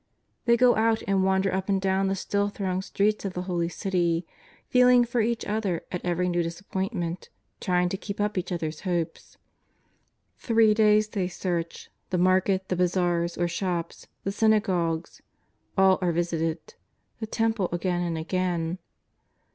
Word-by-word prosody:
They 235 Hz, 0 st, +4 dB
go 245 Hz, 0 st, +5 dB
out 225 Hz, 0 st, +2 dB
and 195 Hz, -1 st, +2 dB
wander 190 Hz, 0 st, +2 dB
up 190 Hz, +1 st, -2 dB
and 195 Hz, -1 st, +2 dB
do^vn 190 Hz, 0 st, +1 dB
the 195 Hz, -, 0 dB
still 200 Hz, +1 st, -1 dB
thronged 190 Hz, -2 st, -3 dB
streets 210 Hz, +1 st, 0 dB
of 195 Hz, -2 st, -3 dB
the 180 Hz, -, -3 dB
Holy 175 Hz, -2 st, -1 dB
City, 175 Hz, -3 st, 0 dB, 0.4 s
feeling 250 Hz, -1 st, +5 dB
for 235 Hz, 0 st, 0 dB
each 230 Hz, +1 st, -1 dB
other 205 Hz, -5 st, -1 dB
at 180 Hz, -, -4 dB
every 180 Hz, 0 st, 0 dB
new 175 Hz, -1 st, +1 dB
dis 170 Hz, +1 st, -4 dB
appointment, 190 Hz, -3 st, -4 dB, 0.3 s
trying 180 Hz, -1 st, +1 dB
to 190 Hz, -, -3 dB
keep 200 Hz, +1 st, -7 dB
up 210 Hz, 0 st, 0 dB
each 185 Hz, 0 st, -3 dB
other's 160 Hz, -3 st, -3 dB
hope. 175 Hz, -4 st, -1 dB, 1.2 s
Three 225 Hz, -2 st, +4 dB
days 215 Hz, 0 st, +4 dB
they 195 Hz, -4 st, -1 dB
search; 175 Hz, -2 st, -4 dB, 0.2 s
the 180 Hz, -, 0 dB
market, 185 Hz, +1 st, +2 dB
the 185 Hz, -, +1 dB
bazaars 175 Hz, -1 st, 0 dB
or 175 Hz, -, +1 dB
shops, 170 Hz, -1 st, -3 dB, 0.2 s
the 195 Hz, -, -1 dB
synagogues 185 Hz, -6 st, +1 dB, 0.3 s
— -, -, -42 dB
all 190 Hz, -1 st, +5 dB
are 180 Hz, -1 st, +2 dB
visited, 165 Hz, -, -2 dB, 0.5 s
the 220 Hz, -, -4 dB
Temple 225 Hz, -4 st, 0 dB
again 175 Hz, 0 st, -1 dB
and 170 Hz, -2 st, -2 dB
again. 175 Hz, 0 st, -1 dB
185 Hz, 165 wpm, -26 LUFS, 175-205 Hz, 1.2 s, go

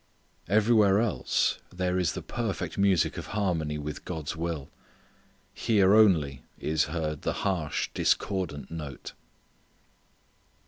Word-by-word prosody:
Everywhere 105 Hz, 0 st, +4 dB
else 115 Hz, -4 st, +1 dB
there 90 Hz, 0 st, -1 dB
is 85 Hz, -5 st, +1 dB
the -, -, -6 dB
perfect 115 Hz, -5 st, -3 dB
music 100 Hz, -3 st, +2 dB
of -, -, -7 dB
harmony 80 Hz, -7 st, 0 dB
with 75 Hz, 0 st, -6 dB
God's 80 Hz, -2 st, -4 dB
will. 80 Hz, -4 st, -4 dB, 0.8 s
Here 100 Hz, -3 st, +3 dB
only 80 Hz, -, +4 dB, 0.2 s
is 80 Hz, 0 st, +1 dB
heard 75 Hz, -1 st, -3 dB
the -, -, -1 dB
harsh 85 Hz, -7 st, -1 dB
discordant 90 Hz, -9 st, -1 dB
note. 75 Hz, -4 st, -7 dB
85 Hz, 110 wpm, -28 LUFS, 75-100 Hz, 0.8 s, Everywhere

